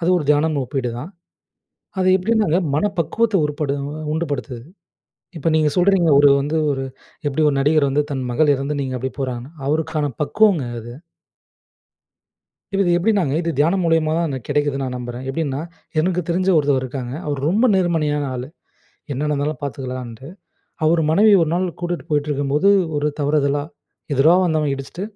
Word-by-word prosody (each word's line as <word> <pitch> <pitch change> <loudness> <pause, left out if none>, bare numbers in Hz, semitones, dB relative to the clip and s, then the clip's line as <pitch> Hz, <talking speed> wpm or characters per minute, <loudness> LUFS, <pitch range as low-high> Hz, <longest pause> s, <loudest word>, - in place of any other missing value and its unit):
அது 170 - 0
ஒரு 160 - -1
தியானம் 150 +1 +2
ஒப்பீடு 125 -1 -3
தான். 150 +9 -7 0.9
அது 185 0 +2
எப்படின்னாங்க, 205 -3 +1 0.2
மன 150 - +1
பக்குவத்த 215 +8 0
உருப்படு 150 -1 -2 0.4
உண்டுபடுத்துது. 145 -6 -3 0.8
இப்ப 160 +2 0
நீங்க 155 -1 +3
சொல்றீங்க, 180 -2 +3
ஒரு 145 0 +6
வந்து 150 +3 -1
ஒரு 135 -1 -2 0.4
எப்படி 145 +2 -1
1 140 - -1
நடிகர் 145 0 +3
வந்து, 145 +2 +1
தன் 135 -2 -2
மகள் 150 +3 +3
இறந்து 140 +2 -3
நீங்க 130 -1 -3
அப்படி 130 +2 -4
போறாங்கன்னு. 130 +2 -4
அவருக்கான 155 -1 -1
பக்குவங்க 195 0 +3 0.2
அது. 120 +1 -9 1.8
இப்ப 195 - +2
இது 175 - +2
எப்படினாங்க? 180 -6 +1
இது 170 - -2
தியானம் 170 +6 +2
மூலியமா 165 -1 +2
தான் 170 0 0
எனக்கு 130 -5 -5
கிடைக்குதுன்னு 145 -2 0
நான் 125 -1 -4
நம்புறேன். 120 0 -6
எப்படின்னா 140 -1 -2 0.4
எனக்கு 180 +2 +1
தெரிஞ்ச 185 +2 0
ஒருத்தர் 140 -3 +2
இருக்காங்க. 130 -1 -5
அவர் 145 -2 -2
ரொம்ப 215 +7 +3
நேர்மையான 160 -5 +1
ஆளு. 125 +1 -5 0.7
என்ன 135 - -4
நடந்தாலும் 150 +1 -1
பார்த்துக்கலான்ட்டு. 130 -3 -6 0.6
அவர் 165 +2 +3
மனைவியை 205 +4 +5
1 155 - -3
நாள் 185 +1 0
கூட்டிட்டு 175 0 -3
போயிட்டுருக்கும்போது, 145 +3 +1 0.3
ஒரு 150 +1 0
தவறுதலா 145 0 +1 0.5
எதிரா 145 +6 +5
வந்தவன் 155 -4 +1
இடிச்சிட்டு 135 +7 -7
150 Hz, 155 wpm, -20 LUFS, 135-170 Hz, 1.8 s, ஒரு